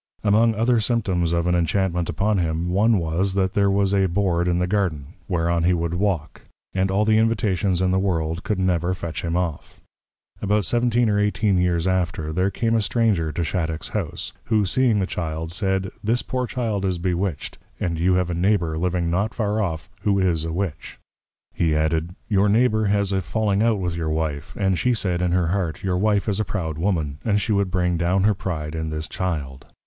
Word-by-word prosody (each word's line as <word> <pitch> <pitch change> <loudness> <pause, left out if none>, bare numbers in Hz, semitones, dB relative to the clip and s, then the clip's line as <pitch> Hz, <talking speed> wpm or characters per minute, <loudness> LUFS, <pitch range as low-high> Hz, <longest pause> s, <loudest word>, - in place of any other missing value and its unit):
Among 110 +2 +3
other 115 +2 +2
Symptoms 100 -7 0
of 85 0 +1
an 90 - +2
Inchantment 90 0 0
upon 100 +5 +1
him, 85 +1 -1
one 105 +4 +3
was, 90 +3 -1
That 95 -1 +1
there 100 -1 +3
was 100 0 +2
a 95 -1 +3
Board 90 -2 0
in 90 -1 +1
the 90 - +1
Garden, 90 -6 -1
whereon 85 -1 0
he 90 +1 +3
would 85 0 -2
walk; 90 -4 -1 0.3
and 95 0 +1
all 100 +3 +2
the 110 0 +4
Invitations 105 -5 +1
in 90 - +2
the 95 - +2
World 85 -3 -1
could 105 - -1
never 90 -1 +1
fetch 85 -3 -5
him 85 0 -1
off. 85 -5 -4 0.6
About 105 0 +1
17 120 +2 +2
or 105 -1 +2
18 105 -1 +1
years 90 -1 +1
after, 85 -4 -1
there 90 +3 +1
came 115 +3 -1
a 115 - +3
Stranger 105 -7 +1
to 85 - -2
Shattock's 80 -1 -2
House, - - -4
who 110 -3 +2
seeing 120 +3 +2
the 95 - +1
Child, 80 -2 -4
said, 95 -1 -1
This 115 +4 +1
poor 125 -1 -2
Child 115 -6 -2
is 95 -2 0
Bewitched; 90 -1 -2 0.2
and 85 -2 -2
you 90 +2 +3
have 90 -1 0
a - - -1
Neighbour 85 -3 +1
living 90 -1 0
not 100 +5 -1
far 110 -1 0
off, 85 -3 -3
who 100 -2 +2
is 85 -4 +1
a 80 - -3
Witch. 85 -2 -4 0.6
He 80 -3 +1
added, 80 +3 0
_Your 100 -1 +3
Neighbour 110 0 +3
has 100 -1 +1
had 95 - +1
a - - -2
falling 105 +1 0
out 115 -1 +3
with 90 -3 -2
your 80 -2 -2
Wife; 80 -2 -3
and 95 -2 +1
she 125 -1 +2
said, 90 -5 0
in 90 -1 +1
her 90 -2 +2
Heart, 90 -3 -2
your 95 -2 0
Wife 105 0 +1
is 105 -1 0
a - - +2
proud 80 -7 -4
Woman, 80 -6 -1
and 105 -2 +2
she 110 - -2
would 100 -2 +1
bring 90 -1 0
down 90 +3 +1
her 105 +1 +4
Pride 80 -6 -4
in 80 -1 -3
this 80 0 -4
Child. 70 -8 -4
95 Hz, 210 wpm, -23 LUFS, 85-105 Hz, 0.6 s, the